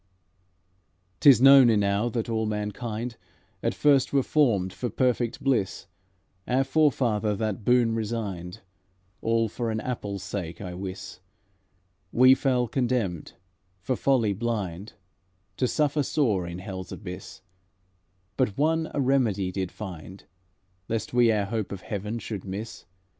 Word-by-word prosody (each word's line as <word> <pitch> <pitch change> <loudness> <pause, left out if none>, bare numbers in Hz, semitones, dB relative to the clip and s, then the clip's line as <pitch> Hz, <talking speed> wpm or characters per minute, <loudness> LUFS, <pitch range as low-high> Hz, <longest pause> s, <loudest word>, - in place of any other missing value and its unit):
"'T - - +7
is 130 - +7
known 135 -1 +8
enow 105 +1 +2
that 115 -1 -3
all 110 -1 -1
mankind 110 +3 -4 0.4
At - - -1
first 140 -3 +3
were 140 -2 +2
formed 105 -13 +2
for 120 - -3
perfect 120 0 0
bliss; 125 -8 0 0.6
Our 130 +2 +2
forefather 125 -8 +1
that 110 0 -3
boon 120 0 +3
resigned, 105 -4 -4 0.6
All 115 0 +1
for 115 +2 -3
an 110 0 -1
apple's 100 -6 -4
sake, 90 -3 -5
I 90 -3 -6
wis; 95 +1 -7 0.9
We 130 +2 +7
fell 130 -2 +1
condemned, 120 - -1 0.5
for 125 +8 -2
folly 120 -7 +2
blind, 100 -3 -3 0.6
To 125 - +1
suffer 150 +2 +1
sore 110 - 0
in 85 0 -6
hell's 95 -1 -7
abyss; 90 -2 -8 0.9
But 125 -7 0
One 160 +2 +1
a - - 0
remedy 120 -9 +1
did 95 -1 -3
find 95 -2 -9 0.7
Lest 115 +1 -3
we 120 -2 +5
our 105 -2 +1
hope 110 0 -3
of 100 -2 -6
heaven 105 +2 -4
should 105 -4 -6
miss. 100 +4 -7
110 Hz, 135 wpm, -26 LUFS, 100-125 Hz, 0.9 s, known